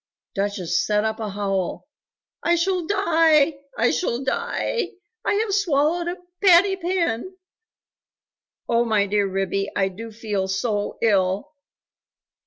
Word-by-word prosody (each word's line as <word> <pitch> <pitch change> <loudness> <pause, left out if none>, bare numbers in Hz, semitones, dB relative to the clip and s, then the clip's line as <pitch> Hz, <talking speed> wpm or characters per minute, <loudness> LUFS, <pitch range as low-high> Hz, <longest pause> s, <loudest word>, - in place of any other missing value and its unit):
Duchess 195 -3 -1
set 210 0 +1
up 220 0 -2
a 215 -2 -3
howl. 195 +2 -2 0.5
"I 340 - +3
shall 350 0 0
die! 325 -6 +3 0.2
I - - +3
shall 255 -8 -1
die! 465 - -2 0.3
I - - +1
have 420 -1 0
swallowed 340 -3 +1
a 350 +1 -3 0.3
patty 385 +1 +6
pan! 365 -3 -2 1.3
Oh, 235 0 +3
my 215 -3 +2
dear 205 0 +1
Ribby, 195 +1 -1
I 195 -1 +2
do 225 +4 -9
feel 210 -3 -2
so 205 +2 -2
ill!" 200 +4 +1
235 Hz, 125 wpm, -23 LUFS, -, 1.3 s, patty